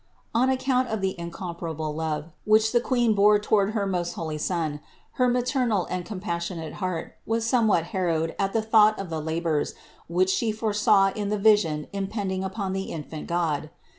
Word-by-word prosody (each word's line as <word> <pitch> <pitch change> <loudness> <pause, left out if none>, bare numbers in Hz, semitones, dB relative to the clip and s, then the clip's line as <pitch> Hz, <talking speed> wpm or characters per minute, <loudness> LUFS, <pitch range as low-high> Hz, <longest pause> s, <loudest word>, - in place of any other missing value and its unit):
611. 230 - +2
On 260 - +3
account 260 -1 +1
of 220 -3 -3
the 190 -2 -2
incomparable 170 -3 -5
love, 160 0 -3
which 215 +1 +4
the 240 - +3
Queen 240 -3 +2
bore 210 +1 +5
toward 205 0 +1
her 205 -2 +1
most 180 -3 -1
holy 155 -2 -4
Son, 155 -3 -1 0.4
her 250 - +5
maternal 245 -5 +1
and 180 -1 -2
compassionate 170 -4 -4
heart 180 -3 -3
was 225 0 0
somewhat 225 -8 +3
harrowed 165 -4 0
at 195 -1 +1
the 225 +1 0
thought 215 -1 +5
of 195 -4 -6
the 160 -1 -2
labors 160 -1 -1 0.3
which 185 +3 +2
She 225 +2 +1
foresaw 210 -2 +3
in 205 -1 -2
the 210 - 0
vision 200 -8 +3
impending 195 -1 -2
upon 190 0 -3
the 195 0 -2
infant 155 -1 -6
God. 160 -3 -1
195 Hz, 175 wpm, -26 LUFS, 170-220 Hz, 0.4 s, bore